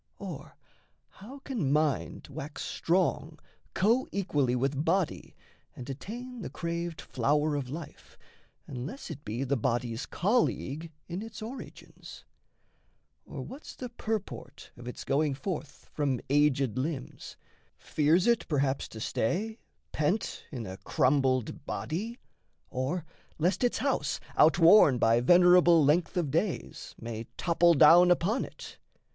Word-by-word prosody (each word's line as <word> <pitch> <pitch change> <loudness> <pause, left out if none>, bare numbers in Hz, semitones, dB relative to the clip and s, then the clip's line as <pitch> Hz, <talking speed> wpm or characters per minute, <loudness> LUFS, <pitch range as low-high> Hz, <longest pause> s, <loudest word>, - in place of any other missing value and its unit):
Or - - -8 0.5
how 235 +9 -12
can 215 - -1
mind 150 -1 0
wax 145 +2 -6
strong 165 -3 0 0.4
Coequally 195 - +1
with 135 +3 0
body 175 +1 -1 0.4
and 125 - -8
attain 240 - -7
The - - -5
craved 170 -1 -4
flower 150 +4 0
of 135 -3 -3
life, 155 +2 -9 0.5
unless 140 - -7
it 145 -2 -9
be 115 +4 -3
The 135 +1 0
body's 120 0 -2
colleague 170 - 0 0.2
in 175 +3 -4
its 225 0 -8
origins? 250 +5 -10 1.0
Or - - -6
what's 280 +4 -10
the 250 - -6
purport 220 -3 -5
of 120 0 -11
its 125 - -6
going 145 0 +1
forth 160 -2 -6
From 140 -4 0
aged 140 -4 +2
limbs? 135 -1 -5 0.4
fears 160 +4 +2
it, 235 0 +2
perhaps, 140 -3 0
to 110 - -10
stay, 200 - -2 0.3
Pent 155 +8 -1
in 125 -6 -5
a 95 -1 -7
crumbled 130 -1 +1
body? 215 +9 -4 0.5
Or 140 +7 -2 0.3
lest 175 +8 +1
its 245 - +2
house, 260 - -1 0.2
Outworn 165 -2 +6
by 115 0 +3
venerable 175 +1 +6
length 165 +5 +2
of 160 -6 0
days, 170 +5 -2
May 115 0 -6
topple 170 0 +3
down 170 +5 +7
upon 185 +8 +2
it? - - -12
155 Hz, 125 wpm, -29 LUFS, 135-185 Hz, 1.0 s, down